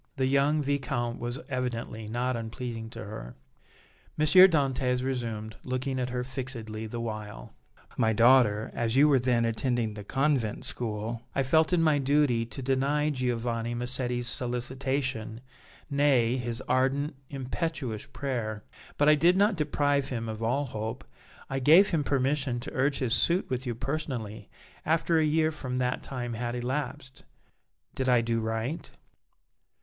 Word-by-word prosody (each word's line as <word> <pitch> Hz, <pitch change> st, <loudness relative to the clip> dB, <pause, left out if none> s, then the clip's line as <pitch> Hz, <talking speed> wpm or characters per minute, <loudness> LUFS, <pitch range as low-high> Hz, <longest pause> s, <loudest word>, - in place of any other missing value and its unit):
The 135 Hz, -2 st, 0 dB
young 140 Hz, +3 st, +2 dB
Viscount 125 Hz, -4 st, -1 dB
was 120 Hz, +2 st, -3 dB
evidently 120 Hz, -4 st, -3 dB
not 120 Hz, +3 st, -1 dB
unpleasing 115 Hz, 0 st, -5 dB
to -, -, -8 dB
her. 60 Hz, -, -8 dB, 0.8 s
M. 155 Hz, -, +2 dB
Dantès 140 Hz, -8 st, +5 dB
resumed, 115 Hz, -5 st, -3 dB
looking 130 Hz, +1 st, -2 dB
at 125 Hz, 0 st, -1 dB
her 125 Hz, 0 st, -2 dB
fixedly 120 Hz, -4 st, -5 dB
the 115 Hz, +2 st, -5 dB
while: 110 Hz, -3 st, -6 dB, 0.4 s
"My 110 Hz, -, +3 dB
daughter, 115 Hz, -2 st, +4 dB
as 115 Hz, 0 st, -1 dB
you 145 Hz, +3 st, +6 dB
were 140 Hz, -3 st, +4 dB
then 120 Hz, -2 st, +2 dB
attending 115 Hz, 0 st, 0 dB
the 105 Hz, -1 st, -8 dB
convent 135 Hz, -2 st, 0 dB
school 110 Hz, 0 st, -3 dB
I 135 Hz, -, +2 dB
felt 160 Hz, +5 st, +3 dB
it 180 Hz, -, +3 dB
my 155 Hz, -3 st, +3 dB
duty 135 Hz, -4 st, +2 dB
to 135 Hz, +3 st, -6 dB
deny 140 Hz, +3 st, +1 dB
Giovanni 120 Hz, -3 st, -2 dB
Massetti's 125 Hz, 0 st, -1 dB
solicitation, 125 Hz, -1 st, -1 dB, 0.5 s
nay, 140 Hz, -5 st, +3 dB
his 120 Hz, -1 st, -3 dB
ardent, 135 Hz, +3 st, +1 dB
impetuous 135 Hz, -, -4 dB
prayer, 115 Hz, -7 st, -4 dB, 0.3 s
but 145 Hz, -, +3 dB
I 150 Hz, -, +8 dB
did 170 Hz, +5 st, +4 dB
not 205 Hz, +1 st, +4 dB
deprive 145 Hz, -3 st, +1 dB
him 115 Hz, -3 st, -3 dB
of 110 Hz, 0 st, -5 dB
all 125 Hz, +6 st, 0 dB
hope; 115 Hz, +1 st, -5 dB, 0.4 s
I 135 Hz, -1 st, -2 dB
gave 160 Hz, +9 st, +6 dB
him 160 Hz, -5 st, +1 dB
permission 135 Hz, -2 st, 0 dB
to 130 Hz, -, -7 dB
urge 135 Hz, +2 st, +1 dB
his 125 Hz, -4 st, 0 dB
suit 170 Hz, +3 st, +1 dB
with 130 Hz, +1 st, -2 dB
you 120 Hz, -, -2 dB
personally 120 Hz, -6 st, -4 dB, 0.3 s
after 165 Hz, +1 st, +2 dB
a -, -, +3 dB
year 155 Hz, +1 st, +2 dB
from 130 Hz, -5 st, -4 dB
that 125 Hz, 0 st, 0 dB
time 120 Hz, -3 st, -5 dB
had 120 Hz, +1 st, -3 dB
elapsed. 130 Hz, +1 st, -4 dB, 0.7 s
Did 130 Hz, -1 st, -1 dB
I 125 Hz, -1 st, +5 dB
do 115 Hz, 0 st, 0 dB
right?" 110 Hz, +7 st, -3 dB
125 Hz, 150 wpm, -28 LUFS, 115-140 Hz, 0.8 s, I